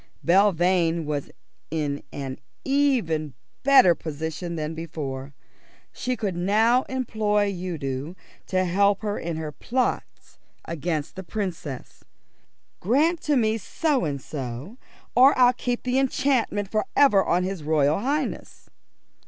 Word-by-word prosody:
Belvane 175 Hz, -3 st, +3 dB
was 145 Hz, -2 st, -3 dB, 0.4 s
in 145 Hz, -2 st, -2 dB
an 135 Hz, -2 st, -6 dB, 0.3 s
even 235 Hz, -, +1 dB, 0.3 s
better 270 Hz, -10 st, +7 dB
position 160 Hz, +2 st, -5 dB
than 155 Hz, 0 st, -3 dB
before. 140 Hz, -4 st, -6 dB, 0.6 s
She 255 Hz, 0 st, -2 dB
could 200 Hz, -5 st, -2 dB
now 220 Hz, +8 st, +3 dB
employ 215 Hz, -5 st, 0 dB
Udo 160 Hz, -4 st, -4 dB, 0.3 s
to 185 Hz, -1 st, +1 dB
help 200 Hz, +3 st, +2 dB
her 205 Hz, -1 st, -2 dB
in 165 Hz, -1 st, -4 dB
her 155 Hz, -1 st, -4 dB
plots 250 Hz, -, -3 dB, 0.3 s
against 165 Hz, -2 st, -3 dB
the 190 Hz, -, -6 dB
Princess. 170 Hz, -, -5 dB, 0.8 s
"Grant 305 Hz, -, +2 dB
to 295 Hz, -, +1 dB
me 220 Hz, -1 st, +1 dB
so 290 Hz, -, 0 dB
and 145 Hz, -4 st, -2 dB
so, 135 Hz, -, -7 dB, 0.4 s
or 260 Hz, +3 st, +6 dB
I'll 250 Hz, -1 st, +6 dB
keep 245 Hz, 0 st, -3 dB
the 255 Hz, +1 st, +1 dB
enchantment 255 Hz, -6 st, 0 dB
for 215 Hz, -1 st, 0 dB
ever 210 Hz, -9 st, +5 dB
on 180 Hz, +1 st, +1 dB
his 190 Hz, -2 st, -3 dB
Royal 150 Hz, 0 st, +2 dB
Highness." 280 Hz, +5 st, -3 dB
185 Hz, 125 wpm, -25 LUFS, 155-240 Hz, 0.8 s, better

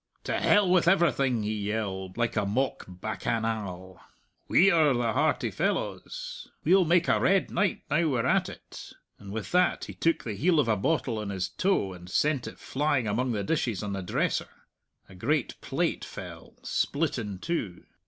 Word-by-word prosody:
"To -, -, -1 dB
hell 205 Hz, -2 st, +4 dB
with 180 Hz, -1 st, +3 dB
everything," 140 Hz, -, +3 dB
he 105 Hz, +1 st, -1 dB
yelled, 100 Hz, -3 st, -3 dB
like 120 Hz, -1 st, 0 dB
a 105 Hz, -, +1 dB
mock 125 Hz, +7 st, -1 dB
bacchanal. 95 Hz, -2 st, -4 dB, 0.5 s
"We're 160 Hz, -7 st, +5 dB
the 120 Hz, -2 st, 0 dB
hearty 155 Hz, +6 st, +1 dB
fellows! -, -, -3 dB, 0.2 s
We'll 190 Hz, -1 st, +5 dB
make 170 Hz, +1 st, +3 dB
a -, -, +3 dB
red 195 Hz, 0 st, +2 dB
night 200 Hz, -3 st, 0 dB
now 160 Hz, +3 st, +2 dB
we're 125 Hz, -6 st, 0 dB
at -, -, +2 dB
it!" -, -, -11 dB, 0.3 s
And 100 Hz, -1 st, -10 dB
with 110 Hz, 0 st, -5 dB
that 180 Hz, +1 st, +2 dB
he -, -, -8 dB
took 165 Hz, 0 st, 0 dB
the 110 Hz, -, -4 dB
heel 160 Hz, -, +2 dB
of 140 Hz, -, +2 dB
a 110 Hz, -, +3 dB
bottle 115 Hz, +1 st, 0 dB
on 105 Hz, -1 st, -4 dB
his 95 Hz, -2 st, -2 dB
toe 180 Hz, -, 0 dB
and 90 Hz, 0 st, -11 dB
sent 145 Hz, +5 st, +1 dB
it -, -, -8 dB
flying 140 Hz, -4 st, 0 dB
among 120 Hz, +4 st, 0 dB
the 105 Hz, -2 st, -1 dB
dishes 115 Hz, -, -1 dB
on 100 Hz, -1 st, -3 dB
the 100 Hz, -, -3 dB
dresser. 90 Hz, -, -1 dB, 0.6 s
A 95 Hz, -, -15 dB
great 130 Hz, +10 st, -1 dB
plate -, -, -1 dB
fell, -, -, -9 dB
split 145 Hz, -2 st, 0 dB
in 105 Hz, -4 st, -5 dB
two. 105 Hz, -, -3 dB
120 Hz, 175 wpm, -28 LUFS, 100-165 Hz, 0.6 s, We're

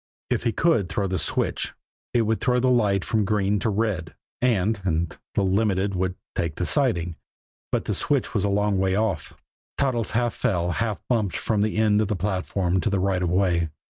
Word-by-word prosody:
If -, -, 0 dB
he 115 Hz, -, +3 dB
could 115 Hz, -, +2 dB
throw 100 Hz, -, -1 dB
the 95 Hz, -1 st, -1 dB
switch, -, -, 0 dB, 0.4 s
it 120 Hz, -, +3 dB
would 110 Hz, 0 st, 0 dB
throw 125 Hz, -1 st, +2 dB
the 130 Hz, +1 st, +3 dB
light 105 Hz, -6 st, +2 dB
from 110 Hz, -2 st, +1 dB
green 105 Hz, 0 st, +1 dB
to 95 Hz, -, 0 dB
red, 100 Hz, -6 st, -1 dB, 0.3 s
and 110 Hz, -4 st, +1 dB
and 85 Hz, -3 st, -1 dB, 0.2 s
the 100 Hz, -, +2 dB
Limited 100 Hz, 0 st, +1 dB
would 95 Hz, 0 st, -1 dB, 0.2 s
take 80 Hz, -3 st, -2 dB
the 90 Hz, -, -2 dB
siding. 90 Hz, -, +1 dB, 0.5 s
But -, -, 0 dB
the -, -, -1 dB
switch -, -, +1 dB
was -, -, +1 dB
a 100 Hz, -, +1 dB
long 100 Hz, -1 st, +1 dB
way 95 Hz, 0 st, +1 dB
off. 100 Hz, -6 st, -1 dB, 0.4 s
Toddles 125 Hz, -5 st, 0 dB
half 120 Hz, -1 st, +1 dB
fell, 90 Hz, -8 st, 0 dB
half 110 Hz, +2 st, -1 dB
bumped 110 Hz, -7 st, 0 dB
from 105 Hz, -2 st, 0 dB
the 105 Hz, 0 st, 0 dB
end 105 Hz, -1 st, +3 dB
of 110 Hz, -, 0 dB
the 105 Hz, -, -1 dB
platform 95 Hz, -1 st, -1 dB
to -, -, 0 dB
the 100 Hz, -, +1 dB
right 95 Hz, -1 st, +1 dB
of 90 Hz, -, 0 dB
way. 90 Hz, -3 st, +2 dB
100 Hz, 200 wpm, -24 LUFS, 95-110 Hz, 0.5 s, he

